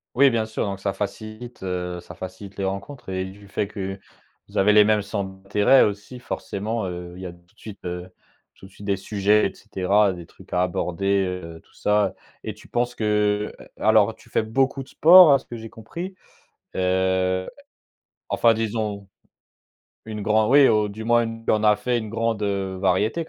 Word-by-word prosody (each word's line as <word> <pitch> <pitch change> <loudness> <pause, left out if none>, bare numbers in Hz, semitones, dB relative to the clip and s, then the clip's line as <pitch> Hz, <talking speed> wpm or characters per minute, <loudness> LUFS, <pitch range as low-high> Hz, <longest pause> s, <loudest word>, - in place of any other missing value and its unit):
Oui, 135 +1 +6
bien 110 -1 0
sûr 110 - -2
donc 100 -1 -4
ça 100 0 -2
facilite 110 +4 -6
heu, 90 -1 -3
ça 90 - -12
facilite 95 +2 -9
les 100 - -2
rencontres 100 +5 -5
et 95 0 -2
du 100 +2 -12
fait 100 +1 -2
que 95 -1 -5 0.5
vous - - -8
avez 105 +2 +5
les 105 - +8
mêmes 105 0 +3
centres 100 -1 -3
d'intérêt 105 +6 +5
aussi 105 +5 -3
forcément, 110 -2 -4
heu, 90 -1 -6
il 95 - -10
y - - -6
a - - -7
tout 85 0 -24
de - - -26
suite 105 -4 -11
heu, 90 +1 -5 0.5
tout - - -15
de 95 - -15
suite 100 +1 -11
des 100 -1 +1
sujets 105 +2 +2
et - - -22
cetera, 100 -1 +1
des 85 -1 -9
trucs - - -16
à 90 0 +3
aborder, 95 +2 0 0.2
heu, 85 0 -9
tout - - -28
ça 105 -2 +1 0.3
et - - -4
tu - - -16
penses 120 0 -1
que 105 -1 0
heu, - - -13 0.2
alors 110 0 +4
tu - - -20
fais - - +1
beaucoup 135 +5 0
de 130 - -10
sport 170 -1 +8
à 140 - +4
ce - - -19
que 120 - -8
j'ai 115 0 -8
compris? 170 - -8 0.6
Heu, 95 0 +1 0.8
enfin 115 -1 +4
disons 105 -3 -3 1.0
une 110 -1 -6
grand 105 +1 +2
oui, 140 +1 +7
au 105 -1 +3
du 105 +2 -7
moins 120 +1 +3
il 115 0 -7
y - - +4
en 110 0 +1
a 105 -1 +5
fait 120 +3 -1
une 110 -2 -4
grande, 115 -1 -1
heu, 95 -2 -2
variété 100 - +1
105 Hz, 205 wpm, -23 LUFS, 95-110 Hz, 1.0 s, les